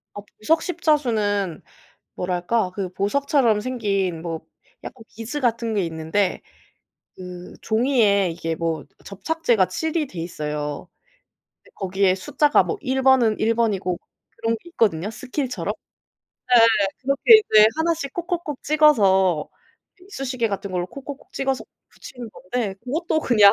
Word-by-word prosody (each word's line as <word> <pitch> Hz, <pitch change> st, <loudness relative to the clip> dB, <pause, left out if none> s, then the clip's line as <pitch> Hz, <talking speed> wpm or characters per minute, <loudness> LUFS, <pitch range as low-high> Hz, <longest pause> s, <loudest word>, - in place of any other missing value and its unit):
아 205 Hz, -, -6 dB, 0.2 s
보석 320 Hz, +10 st, +2 dB
십자수는 225 Hz, -, 0 dB, 0.5 s
뭐랄까 180 Hz, +3 st, -1 dB
그 195 Hz, -2 st, -3 dB
보석처럼 240 Hz, +2 st, +1 dB
생긴 200 Hz, -8 st, -2 dB
뭐 165 Hz, -2 st, -5 dB, 0.4 s
약간 250 Hz, -, -9 dB
비즈 230 Hz, +6 st, -6 dB
같은 230 Hz, -3 st, 0 dB
게 200 Hz, -3 st, +1 dB
있는데 165 Hz, +4 st, -1 dB, 0.7 s
그 180 Hz, -1 st, -9 dB
종이에 220 Hz, -5 st, +2 dB
이게 165 Hz, -1 st, -3 dB
뭐 165 Hz, -1 st, -2 dB, 0.2 s
접착제가 225 Hz, -, 0 dB
칠이 320 Hz, -, -2 dB
돼 185 Hz, -10 st, -8 dB
있어요. 150 Hz, -1 st, -4 dB, 0.8 s
네 -, -, -21 dB
거기에 190 Hz, 0 st, +1 dB
숫자가 290 Hz, +10 st, +2 dB
뭐 435 Hz, -, -3 dB
1 265 Hz, -2 st, -1 dB
번은 255 Hz, -5 st, +4 dB
1 225 Hz, +1 st, +2 dB
번이고 200 Hz, -6 st, 0 dB, 0.4 s
그런 225 Hz, 0 st, -1 dB
게 -, -, -15 dB
있거든요 205 Hz, -, +1 dB
스킬처럼. 255 Hz, +2 st, -4 dB, 0.7 s
네네네. 230 Hz, -5 st, +5 dB
그렇게 275 Hz, -, +6 dB
이제 215 Hz, 0 st, +8 dB
1 330 Hz, +1 st, +1 dB
씩 280 Hz, -4 st, -6 dB
콕콕콕 345 Hz, -5 st, -4 dB
찍어서 195 Hz, -, +3 dB, 0.5 s
이쑤시개 265 Hz, -, -3 dB
같은 200 Hz, -1 st, -4 dB
걸로 180 Hz, -1 st, -2 dB
콕콕콕 275 Hz, +6 st, -10 dB
찍어서 270 Hz, -1 st, -2 dB, 0.2 s
붙이는 245 Hz, -3 st, -10 dB
건데 210 Hz, 0 st, -4 dB
그것도 315 Hz, +5 st, -1 dB
그냥 210 Hz, -8 st, +6 dB
225 Hz, 275 characters per minute, -22 LUFS, 185-270 Hz, 0.8 s, 이제